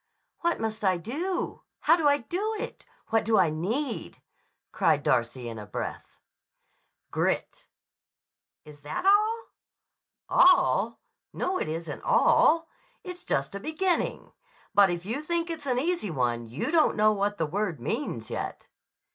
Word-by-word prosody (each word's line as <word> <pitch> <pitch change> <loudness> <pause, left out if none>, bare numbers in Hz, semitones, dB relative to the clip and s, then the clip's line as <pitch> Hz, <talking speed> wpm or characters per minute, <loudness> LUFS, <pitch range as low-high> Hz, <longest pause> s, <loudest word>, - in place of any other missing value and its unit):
"What 340 0 0
must 220 -1 -3
I 185 -2 +3
do? 315 - -3 0.2
How 325 - +5
do 325 -4 +1
I 285 0 +5
do 380 - -3
it? - - -7 0.2
What 225 0 +2
do 220 0 +2
I 165 -4 +4
need?" 225 - -3 0.5
cried 155 -3 +2
Darcy 120 0 0
in 115 -1 -6
a 105 - -9
breath. - - -6 0.9
"Grit." - - -1 1.0
"Is 150 -1 -14
that 150 - -4
all?" 430 +3 +4 0.8
"All? 365 0 +4 0.3
No; 370 0 -1
it - - -2
isn't 160 -1 -5
all. 330 +1 +4 0.4
It's 360 -1 -8
just 140 +4 -1
a 200 - -4
beginning. 325 - -1 0.4
But 200 -1 +6
if 175 0 -3
you 235 +8 -2
think 340 +2 -2
it's 315 -4 -6
an 250 -2 +1
easy 325 - -1
one 120 -6 -1
you 120 +7 -3
don't 325 -3 +3
know 215 0 +5
what 205 0 -1
the 160 - 0
word 180 - -2
means 120 - -3
yet." - - -5
220 Hz, 145 wpm, -27 LUFS, -, 1.0 s, But